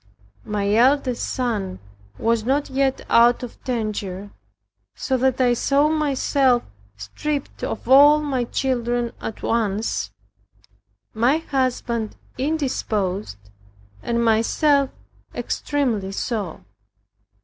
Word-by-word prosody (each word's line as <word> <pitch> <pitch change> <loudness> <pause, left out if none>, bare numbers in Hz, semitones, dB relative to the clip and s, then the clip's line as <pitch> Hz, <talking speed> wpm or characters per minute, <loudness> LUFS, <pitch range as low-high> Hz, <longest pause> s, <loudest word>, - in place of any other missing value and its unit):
My 205 -1 -1
eldest 255 +2 +2
son 215 -7 -2 0.4
was 230 -1 +1
not 275 +4 0
yet 270 0 0
out 240 +1 +4
of 245 - -9
danger, 205 -5 -3 0.6
so 260 - -1
that 260 +1 +1
I 250 -1 +4
saw 280 +5 +2
myself 275 -4 +2 0.3
stripped 275 - -4
of 225 - -4
all 290 +3 +7
my 270 -5 -1
children 240 -2 -1
at 220 - -6
once, 215 - -1 1.0
my 240 +7 +3
husband 250 -7 -2 0.2
indisposed, 215 - -2 0.6
and 235 - 0
myself 270 +5 +3 0.5
extremely 230 -10 -1
so. 205 -6 -4
240 Hz, 95 wpm, -22 LUFS, 220-275 Hz, 1.0 s, all